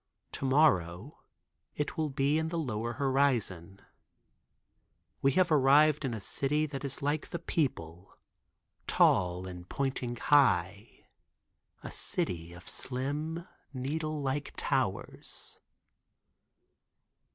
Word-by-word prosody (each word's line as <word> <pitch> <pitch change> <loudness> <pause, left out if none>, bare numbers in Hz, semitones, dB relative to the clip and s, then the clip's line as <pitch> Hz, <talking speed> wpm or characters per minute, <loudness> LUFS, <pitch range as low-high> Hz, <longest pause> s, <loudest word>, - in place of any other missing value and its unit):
To - - -4
morrow 130 - +2 0.6
it 150 - -2
will 155 -1 -1
be 140 +3 +1
in 160 0 -1
lower 120 -9 -2
horizon. 120 - 0 1.4
We 135 0 +3
have 185 0 +3
arrived 150 +1 +5
in 125 -4 -1
a - - -5
city 145 +9 0
that 140 -2 -6
is 140 0 -5
like 145 +1 -1
the 170 - -3
people, 95 - -3 0.8
tall 90 0 +3
and 90 -1 -9
pointing 130 -3 -2
high—a 105 -6 -1
city 85 -1 -2
of 85 +1 -13
slim, 150 +6 -3 0.3
needle 155 +3 -2
like 140 +1 -2
towers. - - -3
135 Hz, 100 wpm, -31 LUFS, 100-150 Hz, 1.4 s, arrived